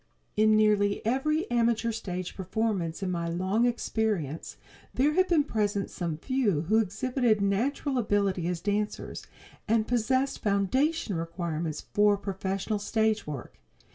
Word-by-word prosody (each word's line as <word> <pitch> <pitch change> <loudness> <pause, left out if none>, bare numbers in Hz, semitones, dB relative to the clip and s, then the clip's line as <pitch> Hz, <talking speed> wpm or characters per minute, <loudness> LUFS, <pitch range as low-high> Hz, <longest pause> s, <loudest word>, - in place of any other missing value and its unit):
In 215 0 +5
nearly 210 -1 +2
every 285 +7 +1
amateur 235 -1 +2
stage 185 -5 -5
performance 190 -3 -2
in 185 - -1
my 170 -1 -2
long 190 +7 +1
experience 215 - -2 0.4
there 290 +4 +3
have 370 +3 +3
been 325 -4 +4
present 205 -6 -1
some 170 -4 -3
few 215 - 0
who 215 +7 +2
exhibited 225 +2 +1
natural 250 +7 0
ability 200 -5 +1
as 175 -1 -2
dancers, 210 +1 -2 0.4
and 220 0 +2
possessed 260 +3 +1
foundation 215 - +1
requirements 165 -2 -3
for 205 0 +4
professional 195 +1 -2
stage 220 -1 0
work. 140 - -7
210 Hz, 130 wpm, -28 LUFS, 185-235 Hz, 0.4 s, In